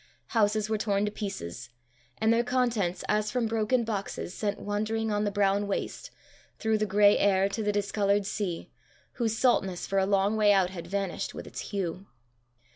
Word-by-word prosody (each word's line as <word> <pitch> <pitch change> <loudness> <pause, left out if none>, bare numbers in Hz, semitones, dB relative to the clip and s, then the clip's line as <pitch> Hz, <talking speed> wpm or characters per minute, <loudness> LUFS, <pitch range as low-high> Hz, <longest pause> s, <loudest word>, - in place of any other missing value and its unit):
Houses 215 -1 +2
were 220 -1 -1
torn 205 -1 +1
to 210 - -2
pieces, 130 - -6 0.5
and 220 +1 +3
their 235 +1 +3
contents, 235 -8 0
as 210 0 +1
from 245 0 0
broken 225 +2 +1
boxes, 200 -4 -4
sent 205 0 -2
wandering 215 +2 -1
on 210 0 0
the 205 - 0
brown 200 0 +2
waste, 350 - -3 0.5
through 220 -1 +1
the 215 - 0
grey 205 +1 +5
air, 195 -1 +3
to 220 - -3
the 210 -1 +1
discoloured 200 0 +1
sea, 190 -4 -3 0.5
whose 225 -1 +1
saltness 195 -8 +2
for 195 - +1
a 190 - +1
long 200 +1 +2
way 210 -1 +5
out 190 -2 +3
had 170 -3 -7
vanished 195 -1 -3
with - - -7
its - - -8
hue. 190 -1 -3
205 Hz, 180 wpm, -28 LUFS, 195-220 Hz, 0.5 s, grey